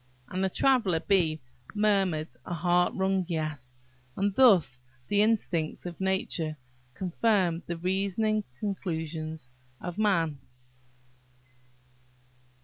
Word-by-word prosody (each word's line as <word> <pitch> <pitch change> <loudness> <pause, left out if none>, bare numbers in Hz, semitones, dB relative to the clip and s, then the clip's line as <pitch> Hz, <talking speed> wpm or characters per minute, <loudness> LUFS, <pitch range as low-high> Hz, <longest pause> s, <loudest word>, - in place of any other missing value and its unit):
And 185 +1 -2
the 190 - +2
Traveller 220 -7 +3
bee 165 -5 +2 0.4
murmured 195 -7 +1
a 175 - -4
heart 175 +1 +2
wrung 190 0 +1
"Yes." 155 -7 -4 0.4
And 200 0 +1
thus 190 - +5 0.3
the 205 0 +3
instincts 190 -9 0
of 175 +1 -7
nature 180 -5 0 0.4
confirm 185 -2 +1
the 170 - -3
reasoning 200 +4 0 0.2
conclusions 160 -7 -4 0.3
of 175 +3 -6
man. 165 -9 +1
180 Hz, 100 wpm, -28 LUFS, 160-200 Hz, 0.4 s, thus